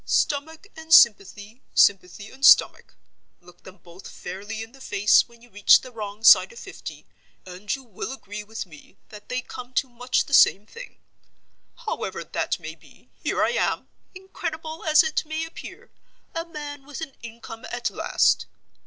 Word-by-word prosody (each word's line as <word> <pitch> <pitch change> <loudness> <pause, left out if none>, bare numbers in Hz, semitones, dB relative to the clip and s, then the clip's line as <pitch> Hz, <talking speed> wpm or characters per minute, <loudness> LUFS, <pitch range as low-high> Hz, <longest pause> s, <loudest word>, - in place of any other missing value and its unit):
Stomach 315 +4 -1
and 320 0 -12
sympathy, 210 - +4
sympathy 200 +1 +2
and 270 +1 -16
stomach—look 175 - +1
them 185 +1 -14
both 175 +2 -14
fairly 205 +5 -7
in 225 - -13
the 270 +1 -18
face 205 -4 +3
when 235 0 -20
you 240 - -19
reach 205 0 +5
the 255 - -11
wrong 210 -2 -8
side 230 - +7
of 475 - -15
fifty, - - -10 0.4
and 185 +5 -4
you 270 - -12
will 230 0 -7
agree 210 -5 -8
with 220 +1 -7
me 155 -5 -17
that 210 -1 -13
they 250 0 -2
come 250 0 -10
to 270 - +1
much 250 +1 -1
the 280 - -10
same 205 -6 +5
thing. 475 - -12 0.9
However - - -4
that - - -3
may - - -8
be, - - -22
here - - 0
I - - +2
am—incredible 335 -8 -5
as 310 +1 +5
it 315 -1 -1
may 315 +1 -4
appear—a 330 0 -11
man 295 -3 -8
with 295 +1 -8
an 310 -4 -6
income, 230 0 -10
at - - -2
last. - - +1
240 Hz, 160 wpm, -24 LUFS, 205-310 Hz, 0.9 s, side